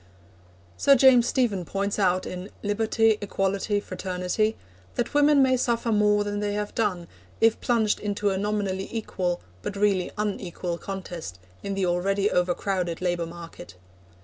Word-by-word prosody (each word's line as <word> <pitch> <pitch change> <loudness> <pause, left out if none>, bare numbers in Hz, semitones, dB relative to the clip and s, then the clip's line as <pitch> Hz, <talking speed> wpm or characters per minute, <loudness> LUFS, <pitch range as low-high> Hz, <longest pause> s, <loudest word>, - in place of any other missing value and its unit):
Sir 280 - +6
James 250 -2 +6
Stephen 225 -8 +1
points 200 +3 -2
out 185 -2 +2
in 180 +2 -6
Liberty, 220 +1 +2
Equality, 200 +1 0
Fraternity, 185 +3 -2 0.4
that 240 - -2
women 290 -1 +5
may 260 -1 +4
suffer 235 -2 0
more 210 -1 +3
than 205 0 -3
they 205 0 -1
have 210 0 -3
done, 185 -6 -1 0.3
if 225 0 +3
plunged 225 -3 +1
into 205 0 -1
a 190 - -1
nominally 200 -2 -1
equal 185 -6 -2 0.2
but 205 - -5
really 200 -3 +1
unequal 185 -4 -3
contest 175 - -6 0.2
in 200 0 -3
the 195 -1 0
already 195 +3 +1
overcrowded 180 -1 0
labour 175 -2 -1
market. 165 - -10
200 Hz, 145 wpm, -26 LUFS, 180-215 Hz, 0.4 s, Sir